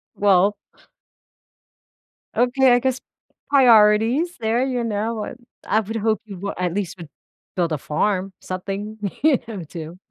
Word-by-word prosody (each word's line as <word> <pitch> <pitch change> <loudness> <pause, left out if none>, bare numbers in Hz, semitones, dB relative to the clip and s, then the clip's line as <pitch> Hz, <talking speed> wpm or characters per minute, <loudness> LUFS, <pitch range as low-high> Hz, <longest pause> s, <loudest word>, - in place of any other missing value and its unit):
Well 200 0 +3 1.8
Okay, 250 +1 +4
I 245 - +4
guess 260 0 -1 0.5
priorities 240 +5 +5
there, 230 +3 +1
you 250 -2 -1
know, 220 +1 -2
what 215 +1 -5 0.3
I 215 - +3
would 220 +1 -5
hope 220 -1 0
you 200 -3 -9
would 200 +2 -4
at 180 -2 -1
least 195 -1 -3
would 165 -4 -10 0.5
build 175 -3 0
a 155 - 0
farm, 190 +6 -1
something 195 +3 -5 0.2
here, 295 -3 +4 0.3
too. 165 +1 -8
210 Hz, 135 wpm, -22 LUFS, 190-245 Hz, 1.8 s, priorities